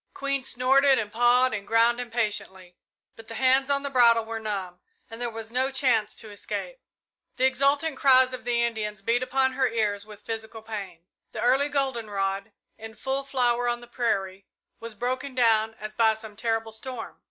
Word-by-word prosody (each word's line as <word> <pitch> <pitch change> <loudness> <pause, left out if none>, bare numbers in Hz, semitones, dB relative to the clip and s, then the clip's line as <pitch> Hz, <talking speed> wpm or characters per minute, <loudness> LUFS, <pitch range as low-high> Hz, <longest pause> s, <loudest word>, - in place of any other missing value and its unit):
Queen 275 -1 -2
snorted 265 +2 +4
and 210 -2 -3
pawed 245 +2 +3
the 215 - -1
ground 230 +4 +2
impatiently, 210 -6 -4 0.4
but 225 0 -13
the 225 - -8
hands 265 +3 +3
on 280 0 +1
the 280 - -3
bridle 235 -3 +5
were 225 0 -5
numb, 195 -5 -5 0.3
and 225 +1 -8
there 240 - -1
was 225 0 -8
no 260 +2 +1
chance 245 -6 +1
to 220 -2 -8
escape. - - -6 0.6
The 255 - +2
exultant 280 +3 +2
cries 260 -1 +5
of 255 0 -7
the 240 -1 +1
Indians 210 -3 -3
beat 235 +4 +1
upon 260 0 +1
her 265 +1 +2
ears 210 -3 -1
with 210 -1 -14
physical 225 0 -6
pain. 195 -6 -7 0.3
The - - -4
early 265 +4 +3
goldenrod, 215 -8 -2 0.3
in 220 0 -9
full 270 +3 -2
flower 245 -3 +1
on 240 0 -1
the 240 - -12
prairie, 195 -6 -2 0.3
was 230 -1 -7
broken 255 +4 -3
down 225 -3 +3
as 215 0 -7
by 220 0 +3
some 220 -1 -10
terrible 225 0 -1
storm. 230 +1 -7
235 Hz, 180 wpm, -26 LUFS, 220-260 Hz, 0.6 s, bridle